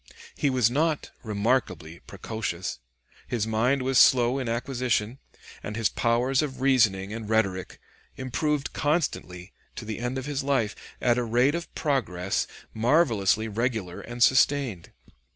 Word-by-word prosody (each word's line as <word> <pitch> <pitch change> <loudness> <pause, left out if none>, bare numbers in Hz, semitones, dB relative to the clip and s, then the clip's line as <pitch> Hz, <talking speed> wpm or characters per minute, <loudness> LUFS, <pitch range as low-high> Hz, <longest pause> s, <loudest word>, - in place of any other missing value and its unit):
He 145 - +1
was 125 -3 +2
not 155 +3 0
remarkably 105 -7 -1
precocious. 95 - -4 0.5
His 115 -3 -1
mind 120 +5 +1
was 130 0 +3
slow 125 +1 +5
in 125 -3 -3
acquisition, 120 -1 -1 0.4
and 105 - -6
his 115 -2 +1
powers 125 +4 +1
of 140 -3 -4
reasoning 110 -7 +2
and 110 -1 -6
rhetoric 100 -5 0 0.4
improved 140 +3 -2
constantly 100 - -2 0.2
to 115 - -7
the 110 0 -5
end 125 +2 -3
of 130 - -4
his 145 -2 -2
life, 130 -7 0 0.2
at 120 -1 +2
a - - 0
rate 120 +5 +2
of 170 +1 -5
progress 100 - -1 0.3
marvelously 110 - +2
regular 110 -4 -2
and 120 0 -1
sustained. 130 -8 +2
120 Hz, 135 wpm, -26 LUFS, 105-135 Hz, 0.5 s, slow